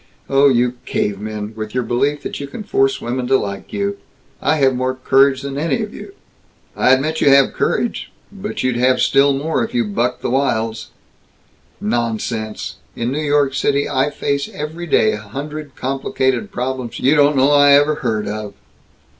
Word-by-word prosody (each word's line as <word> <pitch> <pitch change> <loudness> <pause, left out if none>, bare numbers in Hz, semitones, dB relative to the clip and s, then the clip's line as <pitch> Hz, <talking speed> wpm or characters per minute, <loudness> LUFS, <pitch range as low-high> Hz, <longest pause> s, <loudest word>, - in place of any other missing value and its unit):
Oh, 140 +1 +4
you 125 -1 +1
cavemen! 105 +1 -3
With 110 +1 -6
your 125 - +1
belief 140 +5 0
that - - -5
you 140 - -5
can 215 +10 -8
force 400 - +1
women 125 +1 -3
to 135 +1 +4
like 100 -3 -5
you! 200 0 -2 0.4
I 145 - +2
have 135 -3 +3
more 130 +1 -1
courage 135 +1 +3
than 140 0 -4
any 165 +8 0
of 210 - -7
you!" 395 - -10 0.6
"I - - +2
admit 145 +5 +2
you - - +5
have 135 -1 +5
courage, 235 - -1 0.2
but 205 +1 -5
you'd 130 -2 0
have 130 +1 +3
still 140 +1 +4
more, 150 +4 -1
if 230 +2 -5
you 240 -1 +2
bucked 125 - -2
the - - -1
wilds." 115 -4 -1 0.9
"Nonsense! 110 -1 -3 0.2
In 120 +1 -2
New 150 +3 -2
York 145 -2 +2
I 140 -1 +1
face 140 -1 -2
every 160 +4 -6
day 110 -7 +3
a 105 - -3
hundred 145 +6 -7
complicated 130 -4 -1
problems 125 -1 -4
you 135 - +3
don't 145 -1 +4
know 135 +2 +4
I 145 -1 +6
ever 145 +2 +5
heard 110 -5 -1
of!" 105 -1 -5
135 Hz, 175 wpm, -18 LUFS, 120-145 Hz, 0.9 s, I